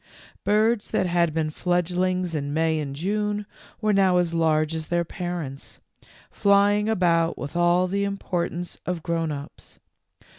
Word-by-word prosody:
Birds 215 Hz, +1 st, +2 dB
that 185 Hz, -, 0 dB
had 170 Hz, -2 st, +2 dB
been 155 Hz, 0 st, -1 dB
fledglings 180 Hz, +1 st, 0 dB
in 145 Hz, -1 st, -2 dB
May 160 Hz, 0 st, +1 dB
and 140 Hz, -2 st, -4 dB
June 210 Hz, +5 st, -1 dB, 0.4 s
were 215 Hz, -1 st, +2 dB
now 190 Hz, -2 st, +4 dB
as 175 Hz, -2 st, +1 dB
large 155 Hz, -1 st, +2 dB
as 160 Hz, -1 st, -4 dB
their 175 Hz, 0 st, 0 dB
parents, 170 Hz, -6 st, -6 dB, 0.5 s
fly 200 Hz, 0 st, +4 dB
ing 210 Hz, +1 st, 0 dB
about 170 Hz, -5 st, +2 dB
with 140 Hz, -, -6 dB
all 175 Hz, +1 st, +3 dB
the 200 Hz, +2 st, -1 dB
importance 180 Hz, -3 st, -3 dB
of 175 Hz, -3 st, -2 dB
grown 165 Hz, -2 st, -1 dB
ups. 145 Hz, -1 st, -9 dB
175 Hz, 150 wpm, -24 LUFS, 160-195 Hz, 0.5 s, now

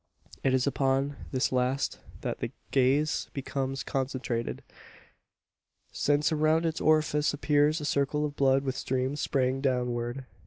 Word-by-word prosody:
It 130 Hz, -1 st, +3 dB
is 130 Hz, -, +1 dB
upon 135 Hz, 0 st, +1 dB, 0.2 s
this 130 Hz, -1 st, +1 dB
last 130 Hz, +2 st, 0 dB, 0.2 s
that -, -, -3 dB
the -, -, -3 dB, 0.2 s
gaze 140 Hz, +3 st, +2 dB
becomes 135 Hz, 0 st, -3 dB
concentrated: 130 Hz, -4 st, -3 dB, 1.3 s
since 145 Hz, +2 st, +1 dB
around 155 Hz, +1 st, +2 dB
its 160 Hz, -1 st, -1 dB
orifice 155 Hz, -1 st, +2 dB
appears 150 Hz, +2 st, +2 dB
a 150 Hz, -, -5 dB
circle 145 Hz, +1 st, +1 dB
of 145 Hz, -1 st, -5 dB
blood 135 Hz, -1 st, +3 dB
with 135 Hz, -1 st, -2 dB
streams 130 Hz, +3 st, -1 dB
straying 130 Hz, -1 st, 0 dB
downward. 125 Hz, -1 st, -1 dB
135 Hz, 130 wpm, -29 LUFS, 130-150 Hz, 1.3 s, It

